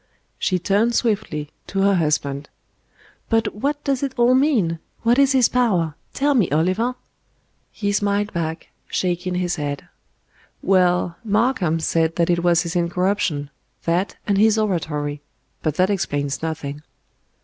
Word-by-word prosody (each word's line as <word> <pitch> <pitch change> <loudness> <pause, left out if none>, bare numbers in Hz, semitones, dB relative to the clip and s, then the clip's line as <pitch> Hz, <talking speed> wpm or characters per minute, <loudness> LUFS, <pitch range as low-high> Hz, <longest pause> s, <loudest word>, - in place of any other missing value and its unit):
She 185 - +1
turned 205 +6 +1
swiftly 200 - -1 0.2
to 195 - -1
her 200 0 +4
husband. 150 -4 0 0.8
"But 225 -2 +1
what 285 +7 -2
does 275 -3 0
it 275 -2 -2
all 240 +1 +5
mean? 245 - +2 0.2
What 235 +3 +4
is 275 -1 +5
His 255 -3 +5
power? 190 -11 +1 0.2
Tell 285 +1 +1
me, 225 -10 +2
Oliver?" 185 - +1 0.8
He 205 -1 -2
smiled 205 +1 0
back, 165 -1 -3 0.2
shaking 180 0 -1
his 180 -1 -1
head. 145 -2 -4 0.8
"Well, 180 -2 +2
Markham 210 -6 +1
said 165 0 +1
that 170 0 +2
it 170 0 +1
was 175 -1 +4
his 170 +1 -5
incorruption 175 -4 0 0.3
that 180 +3 0
and 200 -1 +1
his 220 +1 +4
oratory; 150 -8 -1 0.4
but 155 -2 -1
that 185 +4 +2
explains 145 -7 -1
nothing." 150 -3 -4
185 Hz, 140 wpm, -22 LUFS, 165-220 Hz, 0.8 s, all